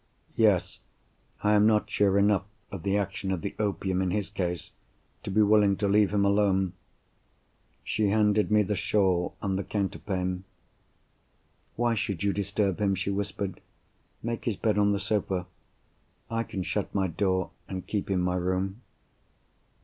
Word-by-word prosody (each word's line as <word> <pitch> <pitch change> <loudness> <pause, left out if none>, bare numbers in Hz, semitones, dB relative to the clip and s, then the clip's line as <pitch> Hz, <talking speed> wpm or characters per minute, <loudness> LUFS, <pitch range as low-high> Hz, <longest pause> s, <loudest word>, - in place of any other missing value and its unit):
"Yes, 95 -5 +2 0.6
I 105 - +4
am 105 0 +5
not 105 -1 +3
sure 100 -2 +2
enough 100 -1 +3 0.3
of 95 -4 -6
the 100 +2 +1
action 100 -1 -2
of 90 -3 -1
the 100 - -4
opium 95 -2 0
in 95 - 0
his 100 +1 -2
case 90 -5 -3 0.5
to - - -6
be 105 +3 +4
willing 105 -2 +4
to 100 - 0
leave 105 0 +4
him 100 -1 +2
alone." 100 -2 +2 1.1
She 105 -2 0
handed 105 0 +3
me 105 0 +4
the 105 - -1
shawl 95 -3 +1
and 95 -1 0
the - - -2
counterpane. 95 -2 -2 1.3
"Why 120 0 +1
should 100 -4 -2
you 100 -1 +2
disturb 100 -1 0
him?" 100 -1 +2
she 100 +1 -2
whispered. 100 -1 -3 0.6
"Make 115 0 -3
his 115 - 0
bed 105 -2 +1
on 105 0 +4
the 100 - 0
sofa. 95 -4 -1 0.9
I 115 0 -1
can 95 -3 -4
shut 105 +2 -3
my 95 -1 +2
door, 95 +1 0 0.2
and 95 -1 -5
keep 100 -2 -3
in 95 -2 +1
my 90 0 0
room." 95 +4 -1
100 Hz, 160 wpm, -28 LUFS, 95-105 Hz, 1.3 s, am